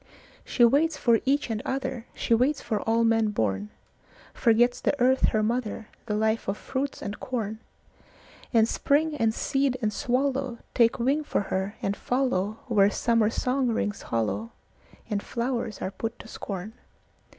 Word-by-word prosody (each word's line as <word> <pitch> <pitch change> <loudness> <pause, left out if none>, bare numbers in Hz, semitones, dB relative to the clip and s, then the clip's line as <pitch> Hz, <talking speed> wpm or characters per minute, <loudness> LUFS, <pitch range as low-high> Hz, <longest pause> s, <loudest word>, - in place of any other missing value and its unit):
She 240 - +4
waits 295 +6 +3
for 230 -2 +3
each 275 -2 +1
and 215 -1 -2
other, 265 -3 -3
She - - 0
waits 260 +6 +3
for 215 -3 -2
all 230 +1 +3
men 225 -1 +3
born; 105 - -1 0.6
Forgets 240 +2 +3
the 285 - 0
earth 260 +2 +4
her 215 -1 +1
mother, 225 -1 -2 0.2
The 210 - -1
life 220 +1 0
of 195 +1 -1
fruits 275 +1 -4
and 205 0 -5
corn; 220 -4 -3 0.9
And 225 -2 +4
spring 300 +5 +1
and 225 -4 +2
seed 270 +3 0
and 215 -3 0
swallowTake 255 -2 0
wing 270 +5 +1
for 295 - 0
her 190 +2 -1
and 195 - +1
followWhere 215 -4 +1
summer 230 -2 +2
song 255 +3 0
rings 210 -3 -2
hollowAnd 115 - -1 0.7
flowers 235 -3 -3
are 190 - -2
put 225 +3 -5
to - - -12
scorn. 200 0 -6
230 Hz, 150 wpm, -27 LUFS, 215-260 Hz, 0.9 s, She